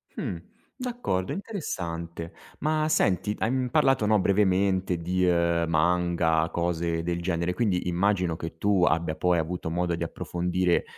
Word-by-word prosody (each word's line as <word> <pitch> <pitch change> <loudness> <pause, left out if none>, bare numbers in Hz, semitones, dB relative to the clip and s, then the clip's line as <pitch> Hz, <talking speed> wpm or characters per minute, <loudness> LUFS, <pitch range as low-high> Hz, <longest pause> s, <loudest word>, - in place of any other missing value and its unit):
Mh. 85 - -3 0.4
D'accordo, 245 - -2
interessante. 85 - -5 0.3
Ma 155 0 +1
senti, 105 - +2
hai, 110 - +1
mhmm, 130 -1 0
parlato, 135 -4 +3
no, 105 0 +4
brevemente 95 -2 +2
di, 90 +2 0
ehm, 85 -1 +2
manga, 85 0 +2
cose 85 -1 -1
del 85 +1 -2
genere, 85 0 -1
quindi 90 -3 0
immagino 90 -1 +1
che 80 0 -7
tu 100 0 +2
abbia 80 -2 +1
poi 90 0 +2
avuto 80 +1 -3
modo 85 +1 0
di 85 - -3
approfondire 90 +1 0
90 Hz, 140 wpm, -27 LUFS, 85-100 Hz, 0.4 s, no